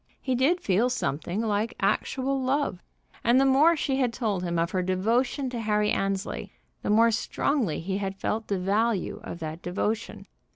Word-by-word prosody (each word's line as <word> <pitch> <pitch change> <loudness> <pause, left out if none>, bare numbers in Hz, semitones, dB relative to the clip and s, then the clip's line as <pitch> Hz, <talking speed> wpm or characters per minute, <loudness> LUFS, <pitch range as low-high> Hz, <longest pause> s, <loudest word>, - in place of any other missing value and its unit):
He 260 - -1
did 275 +8 +2
feel 210 +6 +2
something 180 - -2
like 220 0 -1
actual 265 +6 0
love. 260 -8 0 0.4
And 240 +2 +5
the 270 - +4
more 290 +6 +5
she 270 -3 0
had 255 -3 +1
told 215 -6 -1
him 170 -1 -2
of 170 +1 0
her 185 - 0
devotion 225 +9 0
to 240 - -3
Harry 210 -1 +1
Annesley, 195 0 -2 0.3
the - - -3
more 225 +2 +5
strongly 230 - 0
he 190 +3 -2
had 195 -1 -3
felt 220 +2 -2
the 200 - 0
value 200 +2 0
of - - -6
that 160 +1 -5
devotion. 210 +5 -3
215 Hz, 175 wpm, -27 LUFS, 190-255 Hz, 0.4 s, And